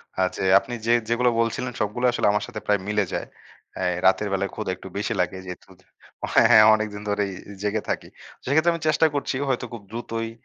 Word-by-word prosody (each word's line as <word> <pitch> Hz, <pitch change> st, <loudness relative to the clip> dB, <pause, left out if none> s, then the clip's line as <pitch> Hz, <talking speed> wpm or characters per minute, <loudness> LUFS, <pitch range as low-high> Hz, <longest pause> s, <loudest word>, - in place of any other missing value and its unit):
অ্যা 95 Hz, -, +2 dB
যে, -, -, -4 dB, 0.2 s
আপনি 120 Hz, -, -9 dB
যে 120 Hz, -, +5 dB, 0.2 s
যেগুলো 120 Hz, +1 st, +3 dB
বলছিলেন 115 Hz, +2 st, -1 dB
সবগুলো 105 Hz, +4 st, -1 dB
আসলে 120 Hz, -, +1 dB
আমার 105 Hz, -, 0 dB
সাথে -, -, -6 dB
প্রায় 105 Hz, -1 st, +2 dB
মিলে 105 Hz, -1 st, +1 dB
যায়। -, -, -3 dB, 0.5 s
অ্যা 95 Hz, -, -2 dB, 0.2 s
রাতের 100 Hz, +2 st, +4 dB
বেলায় 100 Hz, 0 st, -1 dB
ক্ষুদা 95 Hz, -, -3 dB
একটু 95 Hz, -, -11 dB
বেশি 105 Hz, -, -1 dB
লাগে, 90 Hz, +1 st, 0 dB
যেহেতু 90 Hz, +1 st, -9 dB, 0.7 s
হ্যাঁ, -, -, +6 dB
হ্যাঁ, 110 Hz, 0 st, +8 dB
অনেকদিন 105 Hz, -1 st, -4 dB
ধরেই 100 Hz, -1 st, 0 dB, 0.3 s
জেগে 105 Hz, +1 st, -1 dB
থাকি। -, -, -2 dB, 0.4 s
সেক্ষেত্রে 160 Hz, +6 st, +3 dB
আমি 165 Hz, -, -5 dB
চেষ্টা 155 Hz, +1 st, +3 dB
করছি 140 Hz, -, -2 dB
হয়তো 125 Hz, -1 st, -1 dB
খুব 115 Hz, -, -7 dB
দ্রুতই 115 Hz, -1 st, -4 dB
110 Hz, 195 wpm, -24 LUFS, 100-120 Hz, 0.7 s, হ্যাঁ